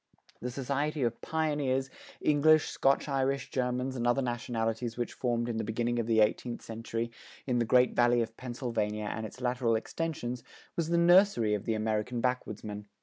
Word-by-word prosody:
The 125 - -3
society 140 +3 -1
of 115 -1 -1
pioneers, 145 -4 0 0.3
English, 155 +1 +4
Scotch 135 +2 +2
Irish, 135 -1 0
Germans, 125 0 -1
and 120 -1 -1
other 130 +3 +2
nationalities 120 -1 -2
which 120 - -2
formed 120 -2 -1
in 115 -2 -2
the 110 - -1
beginning 120 +2 -1
of 115 - -1
the 110 -1 +4
eighteenth 115 +3 0
century 115 +1 -4 0.3
in 125 -2 +1
the 120 - +2
Great 125 +2 +4
Valley 120 -1 +4
of 115 0 -8
Pennsylvania 115 -4 -3
and 110 0 -4
its 130 - -13
lateral 125 -2 +1
extensions 125 -1 -3 0.3
was 165 -2 -1
the 170 - +2
nursery 170 - +5
of 105 - -2
the 110 - 0
American 110 +2 -1
backwoodsmen. 110 -4 -3
120 Hz, 170 wpm, -30 LUFS, 115-135 Hz, 0.3 s, nursery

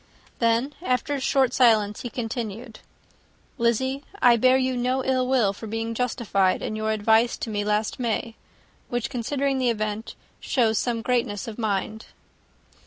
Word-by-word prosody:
Then, 235 +4 +1
after 255 -1 0
a 280 - -1
short 260 -1 +2
silence, 215 -4 +3
he 245 - -5
continued, 225 -2 -5 0.8
"Lizzy, 260 +4 0 0.2
I 245 -1 +6
bear 255 +3 +4
you 260 -1 0
no 255 +2 0
ill 255 -1 +1
will 240 -7 +2
for 220 +3 -9
being 225 +1 -3
justified 225 -6 0
in 215 - -3
your 215 0 -2
advice 220 +2 +3
to 225 - -5
me 205 -1 -1
last 210 +3 -1
May, 230 -1 -2 0.6
which, 240 +1 -2
considering 270 +2 -1
the 255 -1 +2
event, 215 -1 -3 0.2
shows 225 -4 +1
some 235 -2 -2
greatness 235 -5 -1
of 225 0 -7
mind." 215 0 -2
235 Hz, 155 wpm, -24 LUFS, 220-255 Hz, 0.8 s, I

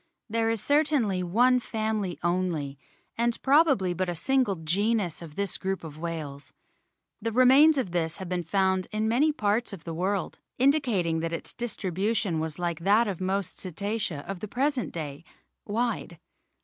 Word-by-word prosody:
There 225 0 +1
is 225 -2 -1
certainly 285 -10 +2
one 245 +8 +3
family 215 -5 -2
only, 175 -6 -1 0.4
and 235 0 +1
probably 275 - +4
but 185 +1 -2
a 175 - -2
single 255 +2 +1
genus 185 +3 0
of 160 -3 -10
this 200 -2 -1
group 190 -1 -2
of 155 -1 -9
whales. 155 -4 -5 0.7
The 230 - -1
remains 265 +6 +6
of 245 -10 -1
this 165 -2 -1
have 190 - -6
been 180 0 -1
found 190 +1 +1
in 215 +1 0
many 265 +8 +3
parts 215 -4 0
of 185 - -9
the 165 - -5
world, 190 +4 -2 0.2
.indicating 245 - +2
that 165 0 -2
its 165 - -5
distribution 200 -4 -1
was 160 -1 -3
like 175 -2 -2
that 205 +6 +3
of 190 -3 -4
most 190 -1 -2
Cetacea 195 -3 -3
of 195 -2 -5
the 215 - -5
present 265 +3 -1
day, 150 -2 -6 0.4
wide. 230 +3 -2
195 Hz, 160 wpm, -27 LUFS, 170-235 Hz, 0.7 s, remains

